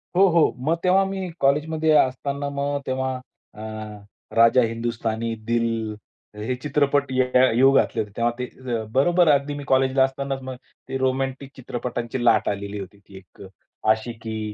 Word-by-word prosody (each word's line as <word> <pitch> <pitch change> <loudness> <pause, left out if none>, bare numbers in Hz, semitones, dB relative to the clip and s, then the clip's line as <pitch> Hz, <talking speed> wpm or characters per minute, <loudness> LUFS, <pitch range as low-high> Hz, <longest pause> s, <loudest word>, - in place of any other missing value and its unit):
हो, 195 +2 +6
हो. 170 -2 +4
मग 160 +2 +2
तेव्हा 190 +1 +4
मी 190 -1 -4
कॉलेजमध्ये 155 +3 +1
असतांना 140 +2 0
मग 140 0 -2
तेव्हा 130 0 -1 0.4
अ, 105 - -11 0.7
राजा 115 +2 +6
हिंदुस्थानी, 115 0 -2
दिल 115 0 +1 0.7
हे 110 +5 -3
चित्रपट 140 0 0
य 130 0 +3 0.3
येऊ 135 +3 +6
घातले - - +2
होते. 105 -1 -7
तेव्हा 120 0 +2
ते 125 -2 -4
बरोबर 175 +6 +3
अगदी 145 +1 +1
मी 145 - -6
कॉलेजला 130 0 +3
असतांनाच 135 0 -2
मग 130 0 -6 0.3
ते 135 - -2
रोमॅन्टिक 130 +1 -2
चित्रपटांची 120 -1 -4
लाट 115 - +4
आलेली 100 0 -4
होती. 100 +1 -9
ती 100 -1 -15
एक 95 - -17 0.5
आशिकी 110 0 -3
130 Hz, 150 wpm, -23 LUFS, 115-140 Hz, 0.7 s, हो